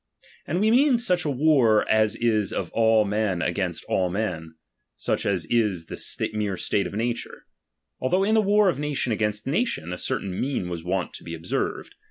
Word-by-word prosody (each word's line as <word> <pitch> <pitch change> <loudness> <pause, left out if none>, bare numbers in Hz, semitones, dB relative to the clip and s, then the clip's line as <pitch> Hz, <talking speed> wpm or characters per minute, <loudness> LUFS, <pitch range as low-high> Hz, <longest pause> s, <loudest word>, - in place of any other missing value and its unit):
And 175 - -1
we 215 +2 +3
mean 260 +1 +4
such 180 -8 +1
a - - 0
war, 130 -6 +3
as 110 0 +2
is 110 -4 +1
of 85 - -3
all 110 -1 +3
men 100 -4 0
against 85 -1 -2
all 90 -1 +1
men; 90 -5 -3 0.4
such - - -1
as 95 -4 0
is 105 -8 +1
the - - -2
mere 105 -3 -2
state 100 - 0
of - - -9
nature; 115 +2 -3 0.5
although 180 +9 +1
in 215 +2 +2
the 220 - +5
war 210 0 +3
of 160 -7 +1
nation 145 -4 -1
against 105 0 -1
nation, 135 - -1
a 90 - -5
certain 95 -2 -3
mean 130 -10 -2
was 85 -2 -5
wont 90 +1 -2
to - - -10
be 85 - -6
observed. 80 - -3
110 Hz, 190 wpm, -25 LUFS, 95-150 Hz, 0.5 s, the